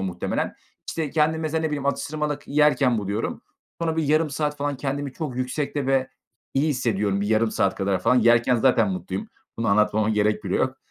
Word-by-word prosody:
muhtemelen. 90 -2 -2 0.4
İşte, 155 -4 -3
kendimi 160 +1 +1
mesela, 160 +1 -1
ne 160 - 0
bileyim, 145 -2 -3
atıştırmalık 145 +1 -2
yerken 140 -5 +3
buluyorum. 100 +2 -3 0.4
Sonra 160 -1 -1
bir 160 - +1
yarım 155 +1 +2
saat 150 +1 -2
falan, 145 -1 -2
kendimi 140 0 -3
çok 145 -6 -5
yüksekte 140 +2 -2
ve 135 -1 +2 0.5
iyi 145 +4 +2
hissediyorum 105 -7 0
bir 100 - -1
yarım 110 0 +2
saat 100 - +1
kadar 95 -1 0
falan. 115 +7 +3
Yerken 120 +1 +4
zaten 130 - +3
mutluyum. 190 +3 -4 0.3
Bunu 115 -2 0
anlatmama 105 +1 +3
gerek 105 0 +1
bile - - 0
yok. - - 0
135 Hz, 180 wpm, -24 LUFS, 110-150 Hz, 0.5 s, Yerken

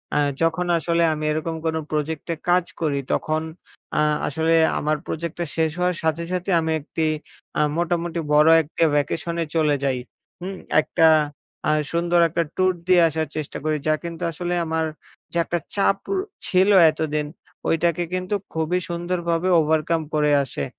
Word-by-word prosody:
আ - - +3 0.2
যখন 165 +2 +1
আসলে 170 +1 +1
আমি 155 0 -4
এরকম 160 +2 -2
কোন 160 0 0 0.2
প্রজেক্টে 155 +2 -2 0.2
কাজ 180 0 +4 0.2
করি, 145 -3 0
তখন 155 0 0 0.6
আ - - +4 0.3
আসলে 160 +2 +1 0.3
আমার 155 +1 0
প্রজেক্টটা 170 +1 -3
শেষ 160 -1 +1
হওয়ার 180 0 +1
সাথে, 160 +1 0
সাথে 180 +1 -2
আমি 160 0 -1
একটি 160 +2 -2 0.5
আ - - +4 0.2
মোটামুটি 170 0 -1
বড় 150 +2 +6
একটি 160 +2 -2
ভ্যাকেশনে 165 +3 -1
চলে 155 -2 +3
যাই। 130 -2 0 0.4
হুম? 190 +2 -5 0.3
একটা 160 +3 +3 0.6
আ - - +4 0.2
সুন্দর 170 +1 +2
একটা 170 +1 0
ট্যুর 185 0 +3
দিয়ে 180 -1 +6
আসার 160 0 -2
চেষ্টা 155 -2 -4
করি 155 0 0
যা 155 - +4
কিন্তু 170 -1 -6
আসলে 175 +2 -3
আমার 160 0 0 0.5
যে, 170 - -3
একটা 175 - -1 0.2
চাপ 195 -1 +3 0.2
র - - 0 0.3
ছিল 185 +2 +3 0.2
এতদিন, 150 -1 -2 0.4
ওইটাকে 170 +1 +1
কিন্তু 185 +2 -1 0.2
খুবই 160 +3 0
সুন্দরভাবে 175 0 -1
ওভারকাম 160 +1 +1
করে 150 -1 +3
আসে। 70 - -4
165 Hz, 155 wpm, -23 LUFS, 155-175 Hz, 0.6 s, বড়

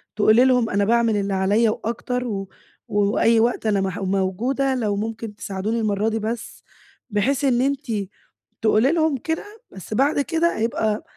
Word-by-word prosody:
تقولي 215 +3 +5
لهم: 250 -3 +3
"أنا 200 +1 +1
باعمل 230 0 +2
اللي 200 -1 -1
عليَّ 205 +4 +2
وأكتر 245 +3 -3
و 195 -4 -4 0.4
وأي 210 +2 +2
وقت 235 0 +1
أنا 205 -2 +2
مـح 190 +1 -3
موجودة 195 +8 0
لو 215 -5 -1
ممكن 220 0 -5
تساعدوني 205 +4 -3
المرة 215 0 0
دي 225 0 -2
بس." 225 +1 -5 0.5
بحيث 250 +7 0
إن 250 -2 +2
أنتِ 280 -1 -1 0.7
تقولي 220 +4 +3
لهم 315 -4 +1
كده 320 +6 -3 0.3
بس 190 +3 -8
بعد 280 +5 +2
كده 330 +3 0
هيبقى 220 -1 -1
225 Hz, 155 wpm, -22 LUFS, 205-250 Hz, 0.7 s, تقولي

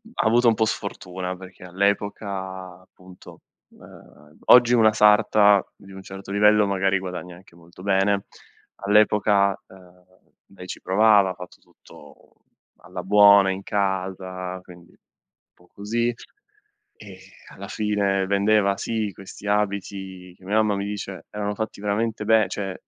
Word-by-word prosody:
ha - - -1
avuto 120 +2 +3
un 115 - +4
po' 110 - +1
sfortuna 90 -3 -5
perché 95 -1 -14
all' 90 +2 -13
epoca 95 -3 -3
appunto 90 0 -17 0.3
uhm 75 +1 -18
oggi 120 0 +6
una 110 -2 +5
sarta 105 -1 +4
di 100 -1 -17
un 95 0 -10
certo 95 +1 -10
livello 105 +1 +4
magari 95 -1 0
guadagna 90 -1 -7
anche 90 -2 -19
molto 85 +2 -16
bene. 100 0 +1 0.6
All'epoca 105 -1 +3
ehm 90 -1 -19 0.5
lei 90 - -11
ci - - -8
provava, 100 0 +4
ha - - -4
fatto 90 0 -12
tutto - - -19 0.4
alla 90 - -9
buona, 100 0 +6
in 95 +1 -5
casa, 95 -2 -3
quindi 85 -1 -16
un - - -27 0.6
po' 90 - -25
così, 115 +4 -2 0.8
e 95 -3 -13 0.3
alla 100 +1 -10
fine 100 -2 -1
vendeva, 100 0 +2
sì, 110 -3 -3
questi 95 +1 -11
abiti 95 -3 -3
che - - -23
mia 105 +3 -2
mamma 105 -2 +2
mi 100 - -3
dice 100 -2 -7
erano 105 0 -4
fatti 110 -2 -5
veramente 105 +1 -2
be 110 -1 +4
cioè 95 -2 -4
100 Hz, 145 wpm, -23 LUFS, 95-105 Hz, 0.8 s, oggi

